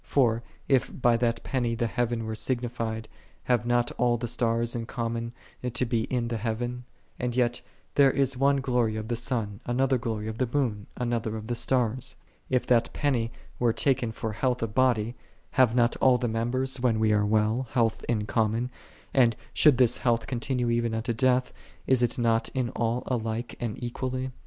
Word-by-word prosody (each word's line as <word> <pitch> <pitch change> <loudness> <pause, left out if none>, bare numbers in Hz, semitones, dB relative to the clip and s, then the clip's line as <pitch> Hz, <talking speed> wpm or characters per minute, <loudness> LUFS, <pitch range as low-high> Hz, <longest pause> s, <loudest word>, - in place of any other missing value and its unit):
For, 115 -5 +2 0.3
if 135 0 +1
by 120 -1 +4
that 115 -1 0
penny 120 -3 -1
the 120 0 0
heaven 115 0 -1
were 110 - -3
signified, 115 -2 -2 0.4
have 120 -2 +1
not 120 0 +2
all 120 -1 +3
the 120 +1 -3
stars 115 0 0
in 115 -1 -4
common 115 -1 -3 0.4
to 125 0 +1
be 115 -2 0
in 120 -2 -1
the 115 - -1
heaven? 120 +3 -3 0.3
And 120 -1 -2
yet, 120 -1 +1 0.2
" - - -37
There 140 -1 +6
is 135 0 +1
one 140 +1 +3
glory 125 -4 +1
of 110 +1 -5
the 120 - 0
sun, 115 -4 -2
another 130 +1 +2
glory 110 -2 -3
of 110 0 -5
the 130 -2 +1
moon, 115 -8 -1
another 115 -3 -1
of 110 - -7
the 120 - -2
stars." 125 0 0 0.3
If 125 -1 +1
that 120 -2 +3
penny 120 -6 0 0.3
were 120 -2 +3
taken 125 -4 +1
for 110 0 -4
health 125 +2 0
of 110 -2 -3
body, 120 -3 +2 0.4
have 125 -3 +4
not 120 -1 +3
all 130 -2 +5
the 125 0 -1
members, 125 +4 -1
when 120 -3 +2
we 110 -1 +3
are 105 0 +3
well, 110 +4 +1
health 115 -3 +1
in 110 -3 +1
com 110 0 +1
mon; 120 +3 -2 0.4
and, 120 -4 +4 0.2
should 150 -5 +5
this 125 -2 +4
health 115 -2 +1
continue 125 0 -1
even 115 -1 0
unto 115 +2 -1
death, 125 +2 +2 0.3
is 130 -2 +3
it 120 +2 +1
not 115 -1 +2
in 125 -2 0
all 120 +1 -1
alike 115 -1 -2
and 115 -3 -3
equally? 130 +2 -3
120 Hz, 190 wpm, -27 LUFS, 115-125 Hz, 0.4 s, There